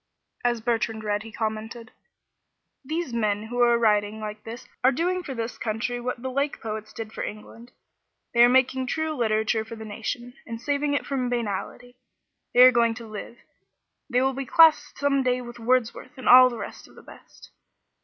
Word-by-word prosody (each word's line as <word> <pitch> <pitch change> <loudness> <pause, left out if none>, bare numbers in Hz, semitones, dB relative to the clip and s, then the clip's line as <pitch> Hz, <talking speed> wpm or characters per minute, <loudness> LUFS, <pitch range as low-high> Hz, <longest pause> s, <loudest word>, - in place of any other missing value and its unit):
As 240 -2 0
Bertrand 225 -1 -1
read 205 -1 -1
he 225 +1 -10
commented. 220 +2 -5 0.9
"These 315 -1 -3
men 210 -3 0
who 245 +2 -3
are 240 -1 +5
writing 210 -2 +1
like 215 0 -7
this 230 +2 -9 0.2
are 260 - +6
doing 360 +7 -1
for 275 -7 -7
this 230 0 -5
country 235 +2 -2
what 245 0 -4
the 260 - -3
Lake 280 +2 -1
Poets 215 -1 -6
did 220 -1 -8
for - - -4
England. 230 +3 -9 0.6
They 235 0 +6
are 240 - +7
making 260 0 +2
true 315 +3 -1
literature 220 -2 0
for 220 +1 -9
the 220 0 -9
nation, 240 +3 -5
and 230 0 -6
saving 285 +2 -1
it - - -2
from 260 -3 -2
banality. 245 +2 -4 0.6
They 245 - +7
are 255 - +9
going 235 -2 +2
to 230 0 -9
live. 215 +2 -8 0.7
They 250 0 +2
will 265 0 +1
be 270 0 -5
classed 315 -1 +5
some 280 -1 +1
day 250 -1 +1
with 240 -1 -9
Wordsworth 255 +3 -1
and 260 - -7
all 255 0 +9
the 240 - -7
rest - - -8
of - - -20
the - - -15
best. - - -16
240 Hz, 190 wpm, -25 LUFS, 220-255 Hz, 0.9 s, are